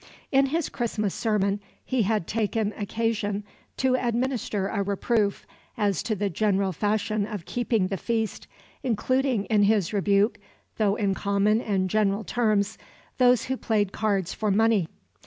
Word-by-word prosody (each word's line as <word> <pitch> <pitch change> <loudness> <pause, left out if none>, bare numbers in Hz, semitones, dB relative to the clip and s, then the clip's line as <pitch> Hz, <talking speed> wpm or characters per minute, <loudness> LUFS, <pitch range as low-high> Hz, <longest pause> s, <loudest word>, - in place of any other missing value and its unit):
In 270 0 +4
his 320 +3 -1
Christmas 215 -4 -2
sermon 205 -3 0 0.3
he 255 -2 +1
had 215 -3 +1
taken 215 0 -1
occasion 210 -1 -1 0.3
to 260 -1 +2
administer 240 -4 -1
a 200 - -1
reproof 200 +1 0 0.3
as 205 -4 +1
to 220 -1 -1
the 205 +1 -1
general 195 0 +1
fashion 210 +2 0
of 205 -6 -6
keeping 230 -3 0
the 195 +1 -2
feast, 225 +1 -2 0.3
including 255 -2 0
in 215 -2 +2
his 205 -2 +2
rebuke, 200 +2 +2 0.4
"though 205 -2 +2
in 200 -3 0
common 200 +3 +1
and 195 -4 0
general 205 +1 +1
terms," 215 -3 0 0.4
those 250 -2 +4
who 260 - -1
played 210 -5 0
cards 200 -5 -1
for 215 -1 -1
money. 210 -3 +3
210 Hz, 145 wpm, -26 LUFS, 200-230 Hz, 0.4 s, In